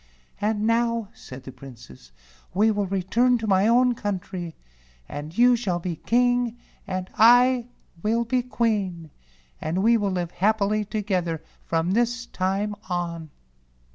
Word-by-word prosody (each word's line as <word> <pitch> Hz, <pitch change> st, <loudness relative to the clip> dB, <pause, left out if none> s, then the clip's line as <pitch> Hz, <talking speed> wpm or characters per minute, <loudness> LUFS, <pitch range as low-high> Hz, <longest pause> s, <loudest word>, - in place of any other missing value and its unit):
"And 210 Hz, 0 st, 0 dB
now," 230 Hz, -1 st, +1 dB
said 130 Hz, 0 st, -11 dB
the 130 Hz, -, -9 dB
Princess, 120 Hz, -, -14 dB, 0.4 s
"we 215 Hz, +3 st, +4 dB
will 205 Hz, -2 st, -1 dB
re¬ 190 Hz, -1 st, -2 dB
turn 245 Hz, +3 st, +3 dB
to 225 Hz, -, -5 dB
my 195 Hz, 0 st, +3 dB
own 245 Hz, +2 st, +4 dB
country, 185 Hz, -5 st, -5 dB, 0.5 s
and 150 Hz, +4 st, -7 dB
you 245 Hz, +1 st, +6 dB
shall 200 Hz, -7 st, -1 dB
be 175 Hz, -1 st, -4 dB
King 245 Hz, +1 st, +1 dB, 0.3 s
and 185 Hz, -1 st, -3 dB
I 245 Hz, +2 st, +6 dB, 0.3 s
will 230 Hz, +4 st, +1 dB
be 250 Hz, +2 st, +1 dB
Queen, 205 Hz, -, -2 dB, 0.5 s
and 175 Hz, +5 st, -1 dB
we 230 Hz, +1 st, +5 dB
will 205 Hz, -2 st, 0 dB
live 175 Hz, -2 st, -2 dB
happily 210 Hz, +1 st, +1 dB
together 185 Hz, -6 st, -2 dB, 0.2 s
from 165 Hz, +2 st, 0 dB
this 240 Hz, +3 st, 0 dB
time 195 Hz, +1 st, -1 dB, 0.2 s
on." 170 Hz, -3 st, -3 dB
205 Hz, 140 wpm, -24 LUFS, 175-235 Hz, 0.5 s, you